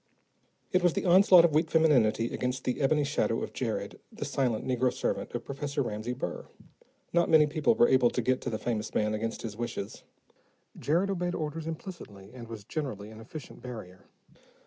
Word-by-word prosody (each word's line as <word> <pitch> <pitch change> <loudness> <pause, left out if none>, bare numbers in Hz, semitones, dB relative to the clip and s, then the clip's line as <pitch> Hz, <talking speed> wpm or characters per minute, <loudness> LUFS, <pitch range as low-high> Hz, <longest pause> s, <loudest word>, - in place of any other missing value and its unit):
It 185 - +3
was 175 -2 +3
the - - -2
onslaught 180 -1 +7
of 165 - +1
weak 160 +2 +2
femininity 125 -9 +3
against 125 +1 -2
the 125 - -2
ebony 150 +2 +3
shadow 140 - 0
of - - -6
Jared, - - -3
the - - -5
silent 125 -5 -1
negro 125 -1 +1
servant - - -3
of 120 - -4
Professor 140 0 -2
Ramsey 110 +1 -3
Burr. 125 - -5 0.7
Not 170 0 +3
many 155 -1 +7
people 155 +9 +1
were 240 - +5
able 130 - +4
to 125 - -1
get 130 +2 +1
to - - -3
the 110 - -2
famous 110 -1 -3
man 105 0 +1
against 110 +1 -3
his 110 -3 -5
wishes; 110 -3 -5 0.7
Jared 175 +7 +1
obeyed 180 -2 -2
orders 155 0 -4
implicitly 155 - -8
and 120 -2 -9
was 110 -2 -8
generally 110 -6 -5
an 110 - -11
efficient 140 +5 -10
barrier. 110 -7 -9
130 Hz, 185 wpm, -29 LUFS, 115-160 Hz, 0.7 s, onslaught